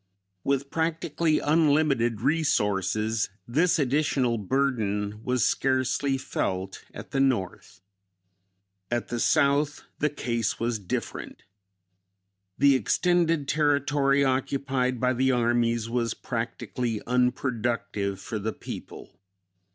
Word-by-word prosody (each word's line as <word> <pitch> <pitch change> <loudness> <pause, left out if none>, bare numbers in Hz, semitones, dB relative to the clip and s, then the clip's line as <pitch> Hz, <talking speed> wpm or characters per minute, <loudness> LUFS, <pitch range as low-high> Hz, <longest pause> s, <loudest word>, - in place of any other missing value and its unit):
With 140 0 -1
practically 160 -1 0
unlimited 145 -7 +2
resources 110 - +1 0.2
this 160 +10 +2
additional 135 -4 +1
burden 105 -3 -1
was 125 -3 +1
scarcely 135 +1 +1
felt 95 -7 -3
at - - -10
the 135 - 0
North. 130 -9 -1 1.1
At 120 -1 -2
the 120 - -2
South, 145 +1 +2 0.2
the 150 - +2
case 115 -5 -2
was 115 -1 -1
different. 95 -3 -5 1.1
The 140 0 +5
extended 165 - +2
territory 140 -1 +2
occupied 130 -1 0
by 125 +1 +2
the 130 +1 +2
armies 120 -2 +1
was 115 -1 -1
practically 115 -1 -3
unproductive 120 -5 -1
for 110 +2 -5
the 110 +2 -3
people. - - -9
125 Hz, 100 wpm, -26 LUFS, 115-140 Hz, 1.1 s, The